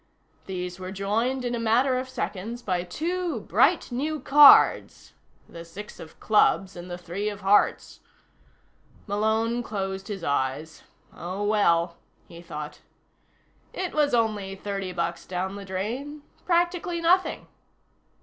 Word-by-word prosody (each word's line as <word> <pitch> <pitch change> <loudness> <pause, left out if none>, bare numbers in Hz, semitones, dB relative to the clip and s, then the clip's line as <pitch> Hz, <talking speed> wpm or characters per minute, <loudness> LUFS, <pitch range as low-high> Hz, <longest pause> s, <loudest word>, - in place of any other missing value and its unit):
These 180 -1 -5
were 185 0 -6
joined, 225 +7 -1
in 245 - -2
a 240 - -2
matter 240 +4 +2
of 260 0 -6
seconds, 230 0 -5
by 180 -3 -1
two 340 - -3
bright - - +2
new 300 +5 -2
cards: 290 0 +6 0.3
the 170 0 -10
six 200 +5 -10
of 160 - -12
clubs 195 -3 +2
and 175 +1 -9
the 175 - -5
three 180 +4 -4
of 205 -1 -8
hearts. 195 +2 +2 1.1
Malone 220 +3 0
closed 195 -3 -4
his 195 -4 -6
eyes. 140 +3 -2 0.3
Oh, 185 +4 -5
well, 170 -5 +2 0.3
he 170 0 -12
thought. 150 -3 -8 0.9
It 370 -2 -4
was 295 -4 +2
only 210 -4 -1
thirty 195 -1 -4
bucks 170 -1 -3
down 190 +1 -3
the 200 -1 -8
drain. 245 +11 -5 0.2
Practically 345 0 +1
nothing. 355 +3 +2
205 Hz, 130 wpm, -26 LUFS, 180-245 Hz, 1.1 s, cards